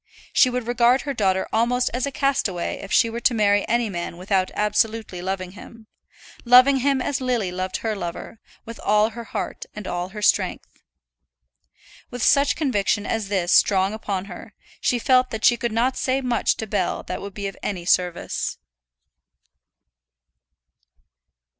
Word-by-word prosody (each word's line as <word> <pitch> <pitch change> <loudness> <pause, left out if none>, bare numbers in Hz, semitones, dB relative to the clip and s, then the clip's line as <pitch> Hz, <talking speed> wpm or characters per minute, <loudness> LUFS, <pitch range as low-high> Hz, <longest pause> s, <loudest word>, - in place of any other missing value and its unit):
She 255 - +5
would 250 -1 -3
regard 240 +2 +3
her 280 - -4
daughter 190 -5 0
almost 240 +3 +1
as 250 +2 -1
a - - -4
castaway 235 -10 -1
if 195 - -9
she - - +4
were 230 +1 -4
to 240 0 +2
marry 205 -2 +2
any 235 0 +1
man 175 -3 -5
without 185 0 0
absolutely 210 -2 0
loving 185 0 -4
him, 220 +3 -13 0.6
loving 255 +3 +6
him 270 0 +1
as 275 -2 -2
Lily 240 -7 -1
loved 185 +1 -3
her 220 -1 -3
lover, 175 +3 -7 0.3
with 230 0 -9
all 210 +2 +2
her 235 +1 -8
heart - - -5
and 210 -1 -7
all 175 0 -3
her 210 +1 -8
strength. - - 0 1.3
With 245 -2 -5
such 280 0 +4
a - - -18
conviction 210 -8 0
as 225 -3 -2
this 185 -3 -1
strong 195 0 +4
upon 200 -3 -4
her, 200 +2 -11 0.2
she 245 - +1
felt 255 +1 +3
that 220 -1 -3
she 240 - +6
could 235 -1 -3
not 245 +4 +1
say 260 +1 0
much 245 -3 0
to 220 - -4
Bell 210 -1 -2
that - - -5
would 200 -1 -8
be 200 - -5
of 195 - -4
any 180 -4 -4
service. 180 -1 0
220 Hz, 165 wpm, -23 LUFS, 195-245 Hz, 1.3 s, loving